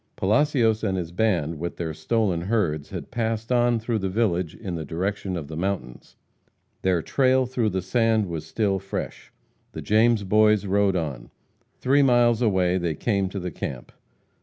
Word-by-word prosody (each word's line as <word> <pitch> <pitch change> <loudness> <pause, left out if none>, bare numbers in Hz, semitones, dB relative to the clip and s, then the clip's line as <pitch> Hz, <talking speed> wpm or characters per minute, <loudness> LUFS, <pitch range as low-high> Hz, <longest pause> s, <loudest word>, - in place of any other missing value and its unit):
Palacios 115 0 +2
and 95 -3 0
his 85 -2 -4
band, 85 -6 0
with 85 +1 -4
their 80 -2 -3
stolen 100 -1 0
herds, 85 -7 -1
had 90 -3 -7
passed 115 -1 -2
on 120 -1 +3
through 115 0 -2
the 95 -1 -2
village 90 -6 0
in 95 -5 -6
the 80 -2 -4
direction 95 +4 -3
of 75 -4 -6
the 80 - -7
mountains. 90 -8 -4 0.7
Their 90 -3 +1
trail 130 -1 +2
through 120 -3 0
the 95 -2 -2
sand 110 +1 +2
was 85 -4 -5
still 95 +3 -1
fresh. 100 +1 -6 0.4
The - - -6
James 110 0 +3
Boys 105 +1 +3
rode 100 0 +2
on. 70 -8 -4 0.5
Three 140 +3 +3
miles 120 -3 +4
away 95 -5 +2
they 85 -3 -2
came 100 +1 0
to 100 - -5
the 90 -1 -4
camp. 65 -4 -6
100 Hz, 170 wpm, -24 LUFS, 85-115 Hz, 0.7 s, miles